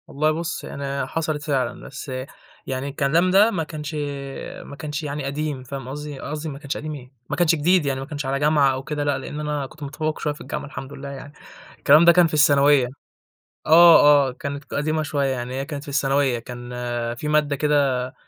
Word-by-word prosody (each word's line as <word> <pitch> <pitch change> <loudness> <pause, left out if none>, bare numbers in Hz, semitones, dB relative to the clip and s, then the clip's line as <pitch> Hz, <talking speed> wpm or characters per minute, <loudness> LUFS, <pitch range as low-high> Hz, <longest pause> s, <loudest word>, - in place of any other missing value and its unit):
والله 155 +2 +1
بُص 165 +1 -3
يعني 140 -1 -4
حصلت 155 0 -2
فعلًا، 135 -5 -2
بس 140 0 -8 0.6
يعني 130 +1 -3
الكلام 155 +6 +2
ده 205 +4 +6
ما 170 -6 -1
كانش 155 0 -6 0.7
ما 140 - -10
كانش 150 +3 -5
يعني 145 0 -4
قديم، 140 -1 -3
فاهم 135 0 -7
قصدي؟ 145 0 -6
قصدي 150 +3 -5
ما 140 -1 -7
كانش 140 -1 -4
قديم 155 0 -5
إيه! 130 -3 -10 0.2
ما - - -1
كانش 170 -1 +3
جديد 170 +2 +3
يعني، 135 -1 -1
ما 135 - -5
كانش 145 -1 -5
على 135 +1 -1
جامعة 145 -2 +3
أو 130 0 -5
كده، 150 +1 -3
لأ 145 -2 +1
لإن 150 +3 -6
أنا 150 -2 -2
كنت 150 +3 -12
متفوّق 155 +2 -3
شوية 150 - -1
في 145 - -14
الجامعة - - -5
الحمد 140 -1 -8
لله 140 0 -7
يعني، 140 +1 -9 0.4
الكلام 150 +4 +6
ده 170 - +9
كان 175 0 +5
في 160 - -9
الثانوية 145 -3 +5 0.8
آه، 155 -4 +7
آه، - - -4
كانت 140 +2 -6
ك - - -10
قديمة 155 +2 0
شوية، 145 -2 -1
يعني 125 -1 -4
هي 135 +1 -2
كانت 145 -1 -6
في 150 - -12
الثانوية، 140 -2 +1
كان 120 +1 -9 0.4
في 150 +5 -5
مادة 150 -1 +2
كده 135 -3 +1
145 Hz, 205 wpm, -23 LUFS, 135-155 Hz, 0.8 s, ده